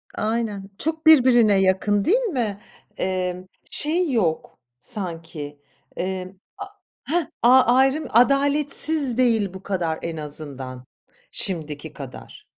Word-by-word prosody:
Aynen. 215 -3 -3
Çok 320 +1 -3
birbirine 245 -8 +6
yakın 195 +2 +1
değil 435 +8 +4
mi? 245 - -2 0.4
Emm, 185 0 -3 0.2
şey 320 +1 +2
yok 175 -10 -1 0.2
sanki, 165 - -5 0.4
emm, 185 0 -4 0.3
a 400 - -5 0.4
heh, 335 +2 0 0.2
a 255 +2 +7
ayrım 270 +4 +2
adaletsiz 280 +1 +2
değil 225 -7 +2
bu 190 +1 -10
kadar 175 -5 -2
en 165 -1 -5
azından, 135 -4 -6 0.5
şimdiki 155 -4 -1
kadar. 135 -3 -11
205 Hz, 110 wpm, -22 LUFS, 170-265 Hz, 0.5 s, a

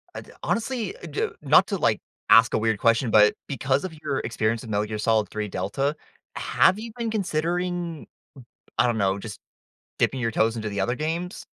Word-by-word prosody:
Uh, - - -5
d - - -16
Honestly, 230 -3 -2
uh, - - -11
d 150 - -1
not 150 +6 +5
to, 200 - -2
like, 115 - +1 0.3
ask 115 0 +7
a - - +3
weird 110 -1 0
question, 115 +1 +2
but 105 -1 +6
because 135 0 0
of 185 -3 -5
your 135 - -1
experience 115 -1 -1
in 115 - -9
Metal 105 0 0
Gear 110 0 -4
Solid 110 -2 +1
Three 105 -1 -3
Delta, 105 +11 -2 0.4
have 190 +3 +3
you 230 +1 -7
been 230 -1 -2
considering, 175 -3 -2 0.7
I - - +5
don't 115 -2 0
know, 95 0 +1
just 105 0 -8 0.6
dipping 130 - +1
your 115 -1 0
toes 115 +1 +1
into 110 -1 -3
the 100 -1 -3
other 120 +6 0
games? 165 +5 -4
120 Hz, 195 wpm, -25 LUFS, 110-170 Hz, 0.7 s, ask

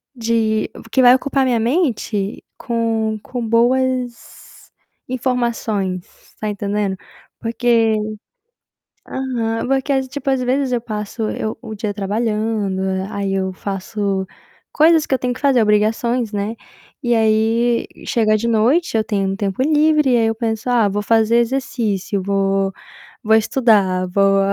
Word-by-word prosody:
de 225 -2 0 0.2
que 260 - +3
vai 250 0 +8
ocupar 270 0 0
minha 245 -3 +1
mente 230 - -1
com 225 -2 -1
com 245 -3 -4
boas 250 +1 +2 0.9
informações, 235 -7 -1 0.3
está 215 - -4
entendendo? 205 -1 -2 0.4
Porque 230 -1 +2 1.1
Aham, 235 -4 -2
porque 270 +1 +1
às 265 -1 0
tipo, 280 +1 -4
às 265 -1 +1
vezes 260 +1 0
eu 240 - 0
passo 215 0 -5
eu 215 - -4
o 225 -3 -7
dia 205 0 -3
trabalhando, 210 -1 -1 0.3
aí 200 -1 -2
eu 190 -1 -1
faço 195 0 -3 0.5
coisas 315 0 +4
que 265 - +2
eu - - -3
tenho 250 -1 -1
que 245 - -10
fazer, 275 -4 +4
obrigações, 220 +2 +1
né, 205 +2 -2 0.5
e 240 -1 +2
aí 225 +2 +2 0.2
chega 215 -2 +2
de 230 +2 -2
noite 235 +9 +2
eu 220 - +2
tenho 200 -3 -1
um 195 - -2
tempo 195 +2 -2
livre 300 -1 +3
e 245 - +4
aí 225 -1 +2
eu 225 - 0
penso: 225 +1 -2
"Ah, 235 -4 +3
vou 205 +1 -2
fazer 225 +1 +3
exercício, 230 -6 -1
vou 195 0 +1 0.5
vou 220 +1 +4
estudar, 210 -6 +2
vou 195 +1 +3
225 Hz, 140 wpm, -19 LUFS, 205-250 Hz, 1.1 s, vai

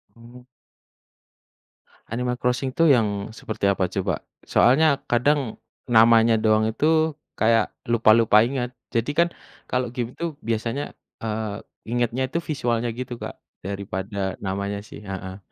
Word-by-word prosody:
Oh. 120 +2 -15 1.7
Animal 125 +1 -2
Crossing 125 +1 0
tuh 165 +5 +3
yang 105 -7 +2
seperti 110 -3 -2
apa 95 -2 +1
coba? 95 -4 -2 0.2
Soalnya 140 +2 +4
kadang 125 0 +1 0.3
namanya 115 0 +6
doang 110 0 +3
itu 155 +6 +2 0.3
kayak 115 -1 +3 0.2
lupa-lupa 115 -2 +5
inget, 125 -2 -3 0.2
jadi 115 +4 0
kan 170 +3 +3 0.4
kalau 125 -2 -1
game 120 -1 -4
itu 170 -1 -3
biasanya, 115 +5 -2 0.3
eee, 110 -2 -3 0.3
ingetnya 120 +2 0
itu 170 - 0
visualnya 120 -6 -1
gitu, 125 0 -5
Kak, - - -6 0.3
daripada 95 0 -4
namanya 100 +1 -2
sih 105 - -12
heeh. 95 -1 -6
115 Hz, 125 wpm, -24 LUFS, 105-125 Hz, 1.7 s, namanya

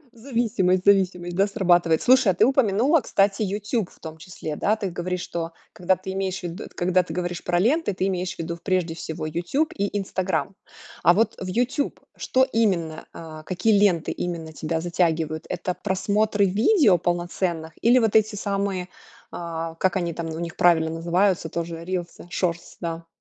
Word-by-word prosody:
Зависимость 225 -7 0
зависимость, 180 -3 +2
да, 195 +1 +4
срабатывает. 175 -5 +2
Слушай, 255 -5 +5
а - - -7
ты 210 - +4
упомянула, 265 - +3
кстати, 200 -4 +1
YouTube 205 +1 -1
в - - -21
том 160 -1 -9
числе, 155 -2 -6
да. 215 +7 +1
Ты 200 -3 -3
говоришь, 180 +1 -3
что 165 -1 -4 0.2
когда 180 +1 +1
ты 185 +1 -7
имеешь 190 0 -3
в 175 - -3
в 205 - -8
когда 185 +1 +2
ты 160 -2 -8
говоришь 175 0 -3
про 175 -1 +1
ленты, 240 - +2
ты 185 +1 0
имеешь 180 -1 -2
в - - -27
виду, 170 +1 -4
прежде 180 -4 0
всего, 160 -1 -6
YouTube 175 - -1
и 200 0 -1
Instagram. 190 0 -2 0.5
А 175 - +6
вот 225 +4 +2
в 190 - -4
YouTube 245 +9 -1 0.2
что 260 0 +2
именно, 175 -8 0
а, 155 -1 -9
какие 200 +5 +2
ленты 185 -5 +2
именно 165 -2 -4
тебя 160 +1 -3
затягивают? 165 -2 0
Это 180 +1 -3
просмотры 205 +2 +1
видео 210 - +4
полноценных 175 -1 -2
или 240 +2 +5
вот 225 -4 +1
эти 220 0 +4
самые, 195 -3 -2 0.4
а, 165 -1 -5
как 185 +3 +1
они 175 -2 -1
там 165 0 -5
у 160 0 -5
них 170 -1 -5
правильно 160 -2 +4
называются, 170 +2 +1
тоже 165 0 -5
рилсы, 175 -1 -5
Shorts, 170 -1 -2
да. 165 -1 -5
180 Hz, 175 wpm, -24 LUFS, 170-200 Hz, 0.5 s, А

